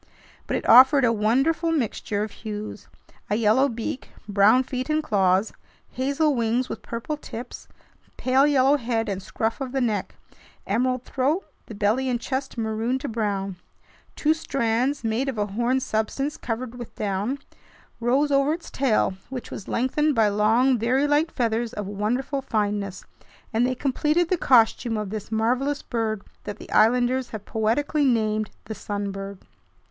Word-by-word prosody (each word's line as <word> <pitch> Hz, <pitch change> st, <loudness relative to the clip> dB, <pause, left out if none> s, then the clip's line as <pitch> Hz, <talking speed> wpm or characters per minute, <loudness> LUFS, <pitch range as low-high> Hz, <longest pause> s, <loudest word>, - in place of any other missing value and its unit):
But -, -, 0 dB
it -, -, -5 dB
offered 260 Hz, +3 st, +8 dB
a 230 Hz, -, +3 dB
wonderful 270 Hz, +10 st, +2 dB
mixture 220 Hz, -7 st, -1 dB
of 215 Hz, -, -5 dB
hues: 215 Hz, -1 st, -7 dB, 0.4 s
a 205 Hz, -, +1 dB
yellow 230 Hz, +5 st, +3 dB
beak, 235 Hz, +2 st, -5 dB, 0.2 s
brown 205 Hz, +5 st, +5 dB
feet 255 Hz, +2 st, -4 dB
and 310 Hz, 0 st, +1 dB
claws, 195 Hz, -3 st, +2 dB, 0.4 s
hazel 280 Hz, +4 st, +1 dB
wings 240 Hz, +1 st, 0 dB
with -, -, -5 dB
purple 235 Hz, +7 st, -4 dB
tips, 245 Hz, -4 st, -8 dB, 0.5 s
pale 265 Hz, +2 st, +3 dB
yellow 280 Hz, 0 st, +4 dB
head 230 Hz, -3 st, -1 dB
and 195 Hz, -2 st, -3 dB
scruff 225 Hz, +6 st, -3 dB
of 260 Hz, -1 st, -4 dB
the 270 Hz, -, +1 dB
neck, 215 Hz, -6 st, -1 dB, 0.5 s
emerald 255 Hz, +4 st, 0 dB
throat, 285 Hz, +10 st, 0 dB, 0.2 s
the 220 Hz, -, -8 dB
belly 220 Hz, +6 st, +1 dB
and 245 Hz, -1 st, 0 dB
chest 265 Hz, +1 st, -4 dB
maroon 225 Hz, +3 st, -1 dB
to 275 Hz, -, -5 dB
brown. 200 Hz, -5 st, -2 dB, 0.6 s
Two 310 Hz, +1 st, +2 dB
strands, 265 Hz, -3 st, -1 dB
made 230 Hz, +5 st, 0 dB
of 255 Hz, -, -4 dB
a 205 Hz, -, +1 dB
horn 240 Hz, +6 st, 0 dB
substance 260 Hz, +6 st, -2 dB
covered 245 Hz, -3 st, -4 dB
with 240 Hz, -, -9 dB
down, 205 Hz, +6 st, -2 dB, 0.6 s
rose 265 Hz, +5 st, +2 dB
over 275 Hz, +2 st, +3 dB
its 335 Hz, +1 st, -7 dB
tail, 255 Hz, -7 st, +1 dB, 0.2 s
which 260 Hz, -2 st, -6 dB
was 195 Hz, -, -7 dB
lengthened 285 Hz, +4 st, +1 dB
by 220 Hz, -2 st, +4 dB
long, 225 Hz, +5 st, +3 dB
very 255 Hz, +5 st, +2 dB
light 295 Hz, +3 st, +2 dB
feathers 230 Hz, 0 st, -1 dB
of 210 Hz, -4 st, -4 dB
wonderful 235 Hz, +8 st, -2 dB
fineness, 205 Hz, -5 st, -2 dB, 0.5 s
and 235 Hz, +3 st, +3 dB
they 255 Hz, -, -1 dB
completed 300 Hz, +6 st, +1 dB
the 370 Hz, -, +3 dB
costume 235 Hz, -5 st, +3 dB
of 210 Hz, -2 st, -4 dB
this 215 Hz, 0 st, -6 dB
marvelous 250 Hz, +6 st, 0 dB
bird 220 Hz, -3 st, -2 dB, 0.2 s
that 205 Hz, 0 st, -5 dB
the -, -, -12 dB
islanders 245 Hz, +3 st, +3 dB
have 215 Hz, -2 st, -7 dB
poetically 245 Hz, +7 st, 0 dB
named 215 Hz, -4 st, +1 dB, 0.2 s
"the 220 Hz, -, -5 dB
sun 205 Hz, -1 st, -4 dB
bird." 195 Hz, 0 st, -6 dB
235 Hz, 160 wpm, -24 LUFS, 215-270 Hz, 0.6 s, offered